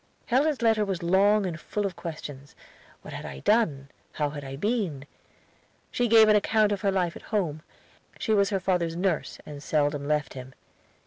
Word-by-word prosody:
Helen's 275 +1 +1
letter 220 -2 +3
was 190 -3 -3
long 200 +4 +4
and 170 -3 -4
full 205 +6 -3
of 195 - -3
questions. 145 -4 -8 0.5
What - - -9
had - - -6
I 65 - -8
done? 145 -12 +1 0.2
How 150 -1 -1
had 145 -1 -7
I 135 0 -6
been? 180 - -2 0.9
She 245 - +1
gave 225 -1 +7
an 215 - +5
account 210 0 +3
of 200 -2 -1
her 200 - +2
life 180 -3 0
at - - -9
home. 170 -8 -1 0.6
She 220 - 0
was 200 -2 +3
her 195 - 0
father's 180 -3 0
nurse, 180 -2 -1
and 145 -1 -9
seldom 145 -1 0
left 150 -1 0
him. 130 0 -10
185 Hz, 185 wpm, -27 LUFS, 150-210 Hz, 0.9 s, gave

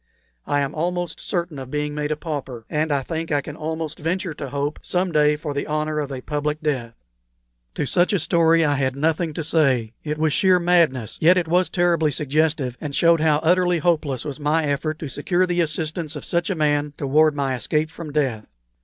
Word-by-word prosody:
I 145 - +1
am 140 +1 -2
almost 175 +2 -2
certain 170 -5 -3
of 130 -1 -8
being 150 +1 -2
made 150 0 -2
a - - +1
pauper, 140 -7 -6
and 155 +1 0
I 140 -2 +1
think 165 +2 -4
I 145 - +3
can 145 +1 -7
almost 160 0 -4
venture 170 +2 -2
to 140 -2 -6
hope 145 +2 -2
some 180 0 -1
day 150 -1 +4
for 150 -1 -5
the 140 - -3
honor 155 0 -1
of 145 -2 -3
a 130 -1 -5
public 150 +2 -2
death." 130 -7 -2 0.8
To - - -1
such 175 +6 +2
a 200 - +2
story 165 0 +3
I 145 - +2
had 135 -2 0
nothing 160 +3 0
to 165 - -3
say. 135 -8 +2
It 150 0 -3
was 155 -1 +1
sheer 185 -2 +4
madness; 165 -10 +2
yet 175 +4 +6
it 175 -2 0
was 180 +2 +2
terribly 170 -3 +2
suggestive, 145 -3 0
and 145 -2 -4
showed 170 -1 +4
how 155 -2 +4
utterly 180 +1 +3
hopeless 155 -6 0
was 145 -2 -5
my 150 +2 +1
effort 150 +2 -1
to 155 - -6
secure 175 +7 0
the 175 -1 0
assistance 155 0 -2
of 145 - -7
such 170 +1 0
a 190 - 0
man 145 -2 +1
toward 150 +2 +3
my 140 -2 -1
escape 150 +6 -1
from 165 -2 -8
death. 130 -8 -1
155 Hz, 210 wpm, -22 LUFS, 145-165 Hz, 0.8 s, yet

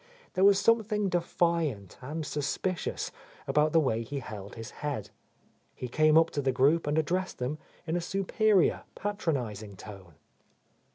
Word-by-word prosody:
There 185 - +2
was 200 0 +7
something 210 -2 +2
defiant 170 - 0
and 150 +5 -4
suspicious 150 +5 -2 0.3
about 150 +1 +3
the 165 - +5
way 115 -7 +1
he 140 +5 -5
held 105 -6 -7
his 115 -1 -7
head. 145 -8 -3 0.6
He 125 - -5
came 155 +4 +4
up 165 0 +5
to 145 - -1
the 135 -1 +2
group 140 +6 +3
and 150 +1 +1
addressed 180 +4 0
them 130 +5 -3 0.3
in 165 +1 -1
a 175 - 0
superior, 195 +2 +2
patronizing 125 - -3
tone. 95 -5 -11
155 Hz, 150 wpm, -29 LUFS, 125-175 Hz, 0.6 s, was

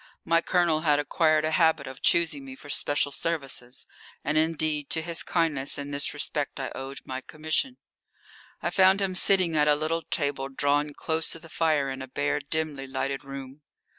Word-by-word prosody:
My 165 0 +3
Colonel 170 -3 +2
had 150 -2 +3
acquired 155 +1 +2
a 155 - 0
habit 160 -3 +3
of 135 -1 -9
choosing 170 - +2
me 265 -1 -9
for 145 - -9
special 145 0 +1
services, 135 -5 -3 0.4
and 150 - -1
indeed 155 -2 0
to 160 - +1
his 170 0 -1
kindness 150 -6 +1
in 145 0 -5
this 140 0 +1
respect 145 -1 -2
I 135 - -3
owed 135 +1 -7
my 130 0 -5
commission. 160 - -2 0.9
I - - 0
found 190 0 +5
him 195 -2 0
sitting 185 -3 +4
at 150 -1 +3
a 150 - +5
little 155 +2 -1
table 140 -3 -1
drawn 145 +2 0
close 160 0 0
to 165 - -6
the 165 0 -12
fire 155 -4 +1
in 130 0 -6
a 130 - -6
bare, 70 - -1
dimly 145 -1 -3
lighted 135 +1 -3
room. 135 +1 -9
150 Hz, 185 wpm, -27 LUFS, 140-165 Hz, 0.9 s, found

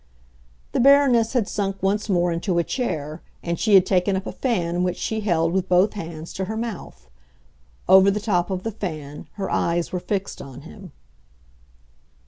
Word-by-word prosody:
The - - -1
Baroness 260 -4 +5
had 240 -6 +1
sunk 195 -2 -3
once 205 +3 0
more 175 -2 +2
into 170 +2 -1
a 170 - +3
chair, 155 - -3 0.2
and 170 -1 -2
she 215 -3 +4
had 190 -1 +7
taken 190 +1 +1
up 190 +1 -3
a - - -4
fan 180 -9 -1
which 180 -1 -1
she 220 - -2
held, 170 -5 +1
with 190 0 -1
both 185 +3 +4
hands, 165 -4 -7
to 190 - -3
her 220 +3 -4
mouth. 205 - -6 0.8
Over 190 +1 +7
the 200 +1 0
top 195 -5 0
of 185 -1 -3
the 225 - -3
fan 155 -8 -6
her 195 -2 -4
eyes 170 0 0
were 180 - -2
fixed 195 +1 -4
on 135 -1 -10
him. 180 +3 -12
190 Hz, 180 wpm, -23 LUFS, 170-210 Hz, 0.8 s, had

